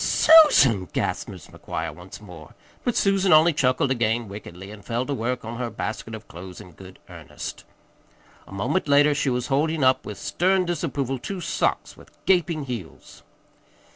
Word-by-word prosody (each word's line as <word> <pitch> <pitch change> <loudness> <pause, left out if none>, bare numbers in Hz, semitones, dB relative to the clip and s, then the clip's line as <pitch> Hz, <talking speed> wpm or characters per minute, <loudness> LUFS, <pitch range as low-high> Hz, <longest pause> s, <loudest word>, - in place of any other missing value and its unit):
"Susan!" 210 - +6
gasped - - -2
Mrs. - - -12
McGuire 80 -1 -5
once 90 +4 -12
more; 90 -7 -13 0.3
but 245 - -1
Susan 195 -1 +2
only 160 +2 +6
chuckled 130 -1 +1
again 120 -2 0
wickedly, 95 -1 -10
and 105 -1 -12
fell 120 +4 -2
to 145 - -3
work 125 -1 -3
on 115 +1 -6
her 120 -2 -2
basket 110 +1 -5
of 110 - -12
clothes 90 +1 -10
in 95 -4 -13
good 95 +3 -14
earnest. - - -9 0.8
A - - -15
moment 125 - -2
later 145 +1 +4
she 140 -1 0
was 125 -1 -1
holding 150 +2 0
up 130 0 +3
with 105 - -8
stern 185 +1 0
disapproval 135 -6 -3
two 195 +8 -6
socks - - -2
with - - -17 0.2
gaping 170 -4 +1
heels. 115 -10 -9
125 Hz, 170 wpm, -24 LUFS, 105-155 Hz, 0.8 s, Susan